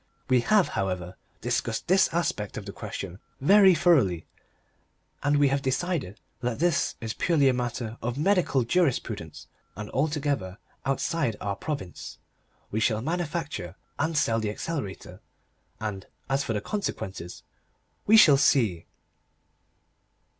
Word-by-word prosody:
We 130 Hz, -1 st, +5 dB
have, 205 Hz, -, +3 dB
however, 90 Hz, -3 st, -3 dB, 0.3 s
discussed -, -, -2 dB
this 190 Hz, +2 st, +4 dB
aspect 160 Hz, -, -2 dB
of 105 Hz, -, -6 dB
the 100 Hz, -, -6 dB
question 100 Hz, -3 st, -7 dB, 0.2 s
very 195 Hz, +5 st, +6 dB
thoroughly, 130 Hz, -, +3 dB, 1.0 s
and 145 Hz, +1 st, +2 dB
we 145 Hz, -1 st, +4 dB
have 140 Hz, +1 st, 0 dB
decided 130 Hz, -, -2 dB, 0.2 s
that 125 Hz, -2 st, -2 dB
this 175 Hz, -1 st, +1 dB
is 110 Hz, -1 st, -4 dB
purely 155 Hz, -6 st, +2 dB
a 130 Hz, -, +4 dB
matter 120 Hz, -2 st, -3 dB
of 120 Hz, +2 st, -3 dB
medical 165 Hz, -5 st, +2 dB
jurisprudence 120 Hz, -, -1 dB, 0.3 s
and 105 Hz, +2 st, -7 dB
altogether 140 Hz, -, -1 dB, 0.3 s
outside 135 Hz, -3 st, 0 dB
our 100 Hz, -1 st, -2 dB
province. 140 Hz, -, -6 dB, 0.5 s
We 110 Hz, -, -1 dB
shall 110 Hz, 0 st, +1 dB
manufacture 155 Hz, -, -3 dB, 0.2 s
and 160 Hz, +1 st, 0 dB
sell 115 Hz, -5 st, +2 dB
the 110 Hz, -2 st, -1 dB
Accelerator, 105 Hz, -, -5 dB, 0.6 s
and, 105 Hz, -3 st, -5 dB, 0.2 s
as 135 Hz, +1 st, +1 dB
for 135 Hz, -, -2 dB
the 105 Hz, -, -1 dB
consequences 95 Hz, -, -5 dB, 0.6 s
we 220 Hz, +2 st, +7 dB
shall 150 Hz, -10 st, +8 dB
see. 110 Hz, -11 st, +2 dB
130 Hz, 130 wpm, -27 LUFS, 105-160 Hz, 1.0 s, shall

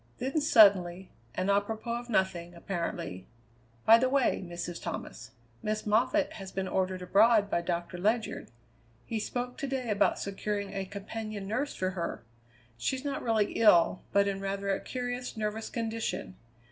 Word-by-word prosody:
Then, 275 Hz, +5 st, -1 dB
suddenly, 190 Hz, -, +5 dB, 0.2 s
and 185 Hz, +2 st, +1 dB
apropos 220 Hz, +4 st, -1 dB
of 240 Hz, 0 st, -11 dB
nothing, 175 Hz, -5 st, 0 dB
apparently: 170 Hz, -, -4 dB, 0.6 s
"By 225 Hz, +1 st, +8 dB
the 255 Hz, +1 st, +2 dB
way, 265 Hz, -7 st, +2 dB
Mrs. 175 Hz, -1 st, -6 dB
Thomas, -, -, -6 dB, 0.3 s
Miss 215 Hz, 0 st, -2 dB
Moffatt 245 Hz, +8 st, +2 dB
has 195 Hz, -2 st, -8 dB
been 190 Hz, -1 st, -2 dB
ordered 185 Hz, -1 st, -1 dB
abroad 205 Hz, +2 st, +4 dB
by 170 Hz, -, +2 dB
Doctor 170 Hz, +1 st, -3 dB
Ledyard. 215 Hz, +4 st, 0 dB, 0.6 s
He 225 Hz, -, -2 dB
spoke 245 Hz, +3 st, -4 dB
to 280 Hz, -, -2 dB
day 260 Hz, -4 st, -2 dB
about 205 Hz, -, +3 dB
securing 200 Hz, 0 st, -3 dB
a 195 Hz, -1 st, -2 dB
companion 205 Hz, +1 st, -6 dB
nurse 255 Hz, +8 st, -2 dB
for 185 Hz, 0 st, -1 dB
her. 170 Hz, -9 st, -4 dB, 0.6 s
She's 265 Hz, -, -2 dB
not 280 Hz, -1 st, -2 dB
really 220 Hz, -3 st, +1 dB
ill, 185 Hz, -5 st, +5 dB
but 200 Hz, 0 st, +4 dB
in 195 Hz, -1 st, -2 dB
rather 195 Hz, 0 st, -2 dB
a 195 Hz, -, +1 dB
curious 245 Hz, -1 st, -4 dB
nervous 215 Hz, +1 st, -2 dB
condition. 225 Hz, -, -3 dB
205 Hz, 155 wpm, -30 LUFS, 190-230 Hz, 0.6 s, By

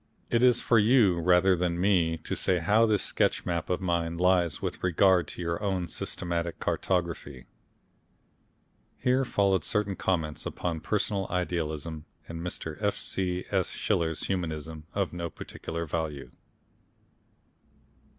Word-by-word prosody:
It 115 Hz, -, +3 dB
is 125 Hz, -1 st, +5 dB
for 115 Hz, -, +4 dB
you 105 Hz, -5 st, +4 dB
rather 90 Hz, +2 st, +4 dB
than 85 Hz, -1 st, -1 dB
me 90 Hz, -4 st, +2 dB
to 80 Hz, -, -4 dB
say 90 Hz, -, +1 dB
how 105 Hz, +7 st, +3 dB
this 105 Hz, -2 st, +2 dB
sketch -, -, 0 dB
map 85 Hz, -2 st, -2 dB
of 90 Hz, 0 st, 0 dB
mine 85 Hz, -2 st, -1 dB
lies 90 Hz, -2 st, +2 dB
with -, -, -4 dB
regard 90 Hz, 0 st, +3 dB
to 90 Hz, -, -6 dB
your 85 Hz, +4 st, -2 dB
own 95 Hz, -3 st, 0 dB
more 85 Hz, -, -4 dB
systematic 85 Hz, +1 st, -3 dB
cartography.... 85 Hz, -8 st, -2 dB, 1.5 s
Here 130 Hz, +2 st, +2 dB
followed 100 Hz, -, +2 dB
certain 105 Hz, -2 st, 0 dB
comments 80 Hz, -6 st, -1 dB
upon 85 Hz, -2 st, -3 dB
Personal 100 Hz, 0 st, -1 dB
Idealism, 80 Hz, -3 st, -3 dB, 0.2 s
and 85 Hz, 0 st, -6 dB
Mr. 80 Hz, -2 st, -5 dB
F. 105 Hz, -1 st, +1 dB
C. 90 Hz, -1 st, -2 dB
S. -, -, +1 dB
Schiller's 80 Hz, -2 st, -1 dB
Humanism, 80 Hz, -4 st, -4 dB
of 100 Hz, -4 st, -1 dB
no 85 Hz, -1 st, -3 dB
particular 85 Hz, +1 st, -6 dB
value. 75 Hz, -5 st, -4 dB
90 Hz, 140 wpm, -28 LUFS, 80-95 Hz, 1.5 s, is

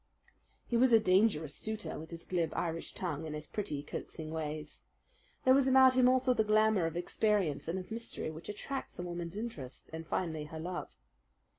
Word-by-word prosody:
He 240 Hz, -, -2 dB
was 255 Hz, +1 st, +5 dB
a 225 Hz, -, +9 dB
dangerous 185 Hz, -7 st, +3 dB
suitor, 220 Hz, -4 st, -5 dB
with 160 Hz, +1 st, -9 dB
his 170 Hz, -1 st, -7 dB
glib 170 Hz, -3 st, 0 dB
Irish 165 Hz, -1 st, -3 dB
tongue, 160 Hz, -4 st, -3 dB
and 150 Hz, -, -4 dB
his 150 Hz, 0 st, -4 dB
pretty, 150 Hz, -9 st, -4 dB
coaxing 155 Hz, +1 st, -6 dB
ways. 155 Hz, -1 st, -5 dB, 0.6 s
There 260 Hz, -, +7 dB
was 270 Hz, 0 st, +4 dB
about 260 Hz, 0 st, +7 dB
him 255 Hz, -1 st, +5 dB
also 255 Hz, 0 st, +4 dB
that 220 Hz, -3 st, +1 dB
glamour 215 Hz, -4 st, +4 dB
of 165 Hz, +1 st, -4 dB
experience 175 Hz, -5 st, +1 dB
and 170 Hz, +3 st, -1 dB
of 185 Hz, +3 st, -7 dB
mystery 230 Hz, -7 st, -4 dB
which 160 Hz, +4 st, -9 dB
attracts 265 Hz, +6 st, -5 dB
a 175 Hz, -, -4 dB
woman's 175 Hz, +1 st, -5 dB
interest, 160 Hz, -, -7 dB
and 160 Hz, 0 st, -6 dB
finally 160 Hz, -4 st, -2 dB
her 160 Hz, +1 st, -7 dB
love. 175 Hz, +2 st, -4 dB
175 Hz, 185 wpm, -33 LUFS, 160-220 Hz, 0.6 s, a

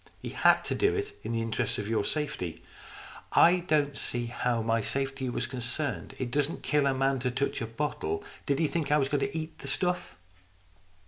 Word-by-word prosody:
He -, -, -6 dB
had -, -, +4 dB
to -, -, 0 dB
do 410 Hz, +1 st, +2 dB
it 415 Hz, 0 st, -3 dB
in -, -, -4 dB
the 115 Hz, 0 st, 0 dB
interests 110 Hz, -1 st, -1 dB
of 105 Hz, -, -3 dB
your 110 Hz, -2 st, +1 dB
safety." 145 Hz, -, -2 dB, 0.4 s
" -, -, -15 dB, 0.2 s
I 180 Hz, +1 st, +3 dB
don't 150 Hz, -4 st, +1 dB
see 120 Hz, -1 st, -3 dB
how 120 Hz, -1 st, 0 dB
my 115 Hz, 0 st, +2 dB
safety 135 Hz, +2 st, -1 dB
was 120 Hz, -, -1 dB
concerned. 130 Hz, +3 st, -3 dB
It 125 Hz, -2 st, -3 dB
doesn't 145 Hz, +3 st, 0 dB
kill 145 Hz, -2 st, +3 dB
a 135 Hz, -, +3 dB
man 135 Hz, 0 st, +2 dB
to 125 Hz, +1 st, 0 dB
touch 135 Hz, +1 st, -1 dB
a 115 Hz, -, -2 dB
bottle. 150 Hz, -, -2 dB, 0.2 s
Did 140 Hz, -, +2 dB
he 165 Hz, -, +2 dB
think 150 Hz, -1 st, -1 dB
I 150 Hz, -, +6 dB
was 135 Hz, -2 st, +1 dB
going 145 Hz, -1 st, +1 dB
to 205 Hz, -5 st, -1 dB
eat 160 Hz, 0 st, -5 dB
the -, -, -7 dB
stuff? 180 Hz, +5 st, -1 dB
135 Hz, 210 wpm, -29 LUFS, 120-155 Hz, 0.4 s, I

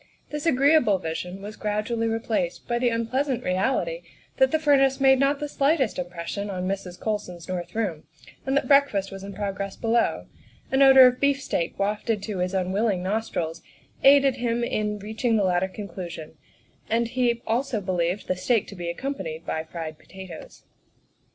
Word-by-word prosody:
This 300 Hz, +2 st, -3 dB
agreeable 275 Hz, -7 st, +4 dB
vision 180 Hz, +3 st, -5 dB
was 210 Hz, +1 st, -7 dB
gradually 215 Hz, +2 st, -1 dB
replaced 225 Hz, -6 st, -2 dB
by 240 Hz, 0 st, 0 dB
the 245 Hz, 0 st, +2 dB
unpleasant 250 Hz, +3 st, -1 dB
reality 180 Hz, -4 st, 0 dB, 0.4 s
that 265 Hz, -, +5 dB
the 315 Hz, -, +2 dB
furnace 275 Hz, -3 st, +3 dB
made 265 Hz, -1 st, +5 dB
not 280 Hz, +1 st, +2 dB
the 295 Hz, -, -3 dB
slightest 280 Hz, -, +1 dB
impression 180 Hz, +3 st, -4 dB
on 185 Hz, -1 st, -3 dB
Mrs. 190 Hz, -2 st, -4 dB
Colson's 205 Hz, -6 st, -4 dB
north 175 Hz, -1 st, -5 dB
room, 190 Hz, -9 st, -2 dB, 0.4 s
and 270 Hz, +1 st, 0 dB
that 265 Hz, -, 0 dB
breakfast 275 Hz, -9 st, +3 dB
was 195 Hz, 0 st, -8 dB
in 200 Hz, -, -7 dB
progress 200 Hz, -1 st, -4 dB
below; 230 Hz, +1 st, 0 dB, 0.5 s
an 265 Hz, +1 st, +3 dB
odor 265 Hz, -1 st, +9 dB
of 250 Hz, 0 st, +3 dB
beef 280 Hz, 0 st, +2 dB
steak 170 Hz, -10 st, -2 dB
wafted 210 Hz, +1 st, -1 dB
to 200 Hz, -3 st, -4 dB
his 180 Hz, +1 st, -1 dB
unwilling 190 Hz, +1 st, 0 dB
nostrils 185 Hz, -5 st, -2 dB, 0.4 s
aided 275 Hz, -1 st, +6 dB
him 240 Hz, -1 st, -1 dB
in 210 Hz, -2 st, -1 dB
reaching 220 Hz, +3 st, -1 dB
the 205 Hz, -, +2 dB
latter 185 Hz, 0 st, +2 dB
conclusion, 175 Hz, -5 st, -8 dB, 0.5 s
and 230 Hz, +1 st, +1 dB
he 240 Hz, -1 st, +1 dB
also 240 Hz, +1 st, 0 dB
believed 180 Hz, 0 st, -1 dB
the 185 Hz, -, 0 dB
steak 220 Hz, +4 st, +1 dB
to 200 Hz, -, -9 dB
be 175 Hz, -2 st, -4 dB
accompanied 170 Hz, -, -5 dB
by 160 Hz, -, -2 dB
fried 160 Hz, -1 st, -7 dB
potatoes. 190 Hz, -2 st, -11 dB
210 Hz, 165 wpm, -25 LUFS, 185-255 Hz, 0.5 s, odor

